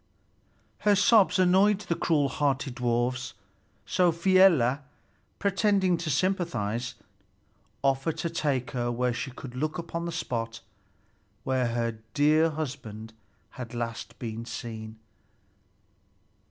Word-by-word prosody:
Her 205 Hz, -1 st, +4 dB
sobs 205 Hz, 0 st, +5 dB
annoyed 190 Hz, +3 st, +4 dB
the 170 Hz, -, -1 dB
cruel 155 Hz, -4 st, +1 dB
hearted 135 Hz, -1 st, -1 dB
dwarfs. 120 Hz, +1 st, -1 dB, 0.5 s
So 180 Hz, -, +3 dB
Fialar, 170 Hz, -7 st, +4 dB, 0.6 s
pretending 200 Hz, -2 st, +2 dB
to 165 Hz, -1 st, -4 dB
sympathize, 130 Hz, -, -1 dB, 0.9 s
offered 135 Hz, +3 st, +1 dB
to 170 Hz, -, -2 dB
take 140 Hz, -6 st, -1 dB
her 120 Hz, -2 st, -1 dB
where 125 Hz, +1 st, 0 dB
she 125 Hz, +3 st, -4 dB
could 125 Hz, 0 st, -9 dB
look 155 Hz, +5 st, -2 dB
upon 170 Hz, 0 st, -4 dB
the -, -, -3 dB
spot 115 Hz, -7 st, -3 dB, 0.8 s
where 130 Hz, -2 st, +1 dB
her 115 Hz, -1 st, -2 dB, 0.2 s
dear 155 Hz, +2 st, +4 dB
husband 125 Hz, -8 st, -6 dB, 0.4 s
had 125 Hz, -1 st, -8 dB
last 115 Hz, -1 st, -5 dB
been 115 Hz, -1 st, -5 dB
seen. 110 Hz, -2 st, -7 dB
135 Hz, 115 wpm, -28 LUFS, 120-170 Hz, 0.9 s, sobs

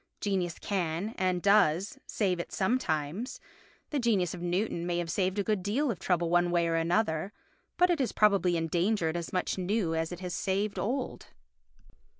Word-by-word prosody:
Genius 185 Hz, -5 st, -1 dB
can, 180 Hz, 0 st, -2 dB
and 185 Hz, -2 st, 0 dB
does, 200 Hz, -, +3 dB
save 185 Hz, -5 st, 0 dB
it 170 Hz, -, -5 dB
sometimes; 190 Hz, -, -1 dB, 0.5 s
the 295 Hz, -, 0 dB
genius 205 Hz, -8 st, +1 dB
of 175 Hz, -, -7 dB
Newton 175 Hz, 0 st, -1 dB
may 175 Hz, -1 st, 0 dB
have 170 Hz, -1 st, -2 dB
saved 190 Hz, +1 st, 0 dB
a 200 Hz, -, +1 dB
good 210 Hz, -2 st, 0 dB
deal 240 Hz, +9 st, 0 dB
of 195 Hz, -, -6 dB
trouble 175 Hz, -2 st, 0 dB
one 175 Hz, 0 st, +3 dB
way 170 Hz, -1 st, +2 dB
or 165 Hz, -, 0 dB
another, 165 Hz, +1 st, +1 dB, 0.5 s
but 360 Hz, 0 st, +4 dB
it 340 Hz, -, +1 dB
has 260 Hz, -, 0 dB
probably 195 Hz, -5 st, +3 dB
engendered 170 Hz, +1 st, 0 dB
as 170 Hz, -1 st, -4 dB
much 185 Hz, +1 st, -1 dB
new 185 Hz, -2 st, 0 dB
as 160 Hz, +1 st, -1 dB
it 175 Hz, -, -6 dB
has 180 Hz, -1 st, -5 dB
saved 200 Hz, +1 st, -1 dB
old. 255 Hz, +4 st, -3 dB
185 Hz, 175 wpm, -30 LUFS, 170-210 Hz, 0.5 s, but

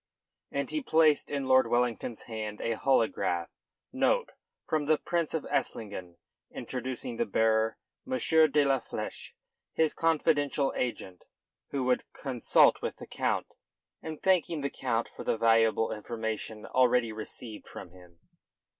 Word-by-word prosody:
And -, -, -2 dB
he 310 Hz, -, -1 dB
placed 160 Hz, -, +3 dB
in 140 Hz, -2 st, -2 dB
Lord 130 Hz, 0 st, +5 dB
Wellington's 120 Hz, -1 st, -1 dB
hand 110 Hz, -2 st, -5 dB
a 115 Hz, -, -1 dB
holograph 110 Hz, -8 st, +1 dB, 0.4 s
note -, -, +1 dB, 0.4 s
from 150 Hz, -2 st, 0 dB
the 155 Hz, 0 st, +4 dB
Prince 170 Hz, -1 st, -1 dB
of 160 Hz, -, -2 dB
Esslingen 95 Hz, -6 st, -3 dB, 0.3 s
introducing 130 Hz, -, -5 dB
the 235 Hz, -, +1 dB
bearer, 110 Hz, 0 st, +2 dB, 0.3 s
M. 260 Hz, -, +1 dB, 0.3 s
de 145 Hz, 0 st, +3 dB
la 135 Hz, -1 st, +3 dB
Fleche, 115 Hz, -, -6 dB, 0.4 s
his 160 Hz, -1 st, +2 dB
confidential 150 Hz, -3 st, +1 dB
agent, 95 Hz, -7 st, -4 dB, 0.4 s
who 135 Hz, -2 st, -2 dB
would 125 Hz, 0 st, +1 dB
consult 130 Hz, -4 st, +3 dB
with -, -, -3 dB
the -, -, -9 dB
Count, -, -, -2 dB, 0.5 s
and 155 Hz, -1 st, -7 dB
thanking 170 Hz, -4 st, +2 dB
the 140 Hz, -, -2 dB
Count 115 Hz, -3 st, -1 dB
for -, -, -10 dB
the -, -, 0 dB
valuable 115 Hz, 0 st, +3 dB
information 110 Hz, 0 st, -4 dB
already 125 Hz, -2 st, +3 dB
received 110 Hz, +1 st, -8 dB
from 90 Hz, -, -10 dB
him. 90 Hz, -2 st, -18 dB
125 Hz, 135 wpm, -29 LUFS, 110-145 Hz, 0.5 s, Lord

